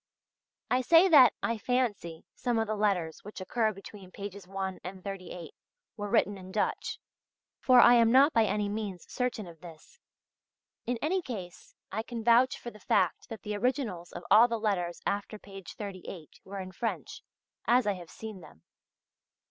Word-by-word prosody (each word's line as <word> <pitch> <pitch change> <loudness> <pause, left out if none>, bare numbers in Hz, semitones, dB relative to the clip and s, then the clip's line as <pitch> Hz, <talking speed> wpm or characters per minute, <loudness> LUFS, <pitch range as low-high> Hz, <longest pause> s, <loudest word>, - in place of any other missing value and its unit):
I 255 - +3
say 330 +8 +6
that 265 - +8
"I 230 -1 -1
fancy" 210 -9 -1
some 245 -2 -1
of 225 - +1
the 215 - -2
letters 190 -6 0
which 210 +1 -9
occur 220 +4 0
between 195 -1 -12
pages 200 -1 -8
1 190 -1 -4
and 185 0 -8
38 185 -3 -7 0.4
were 205 -2 -5
written 200 0 +2
in 185 0 -11
Dutch; 210 - -1 0.6
for 255 -1 +6
I 240 - +8
am 230 -1 +5
not 275 +5 +6
by 225 -1 +4
any 210 0 0
means 200 -4 -4
certain 250 -4 -2
of 165 -2 -13
this. 175 - -14 0.9
In 245 0 0
any 370 +5 +1
case 195 - -8 0.2
I 220 - -2
can 230 0 -6
vouch 240 +3 +4
for 240 - -8
the 210 - -15
fact 185 -2 0
that 225 - -8
the 210 0 -3
originals 220 -7 -2
of 175 - -8
all 230 +3 +8
the 230 -1 -2
letters 180 -5 -1
after 205 +2 -2
page 195 -3 -11
38 185 -5 -8
were 195 +1 -7
in 185 -1 -6
French, 225 +5 -4 0.5
as 245 0 +4
I 205 - +2
have 175 -3 -10
seen 215 -4 -9
them. 80 - -16
210 Hz, 175 wpm, -29 LUFS, 185-235 Hz, 0.9 s, that